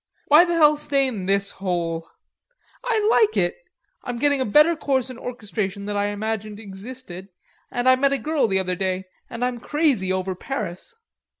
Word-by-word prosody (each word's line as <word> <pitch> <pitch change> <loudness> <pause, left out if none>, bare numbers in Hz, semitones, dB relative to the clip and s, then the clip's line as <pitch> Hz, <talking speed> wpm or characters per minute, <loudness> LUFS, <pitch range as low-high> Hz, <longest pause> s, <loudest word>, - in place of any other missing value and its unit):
"Why 305 +4 +8
the 345 -1 -1
hell 300 -2 +5
stay 280 -2 +1
in 210 -8 -3
this 200 0 +1
hole?" 170 -3 -3 0.8
"I 440 -4 +1
like 435 -1 +3
it. - - +1 0.5
I'm 245 -2 -4
getting 285 +1 +2
a - - +1
better 300 +10 +5
course 265 -4 -1
in 250 - -10
orchestration 210 -5 -4
than 205 0 -3
I 205 0 +1
imagined 215 0 -4
existed, 195 -2 -9 0.4
and 245 +1 -2
I 255 - +7
met 275 +1 +2
a 280 - +1
girl 305 -3 0
the 190 -2 +1
other 185 -1 0
day, 185 0 -1 0.3
and 235 +2 -2
I'm 250 -1 -2
crazy 270 - +1
over 185 0 -1
Paris." 200 - -6
230 Hz, 180 wpm, -23 LUFS, 195-280 Hz, 0.8 s, Why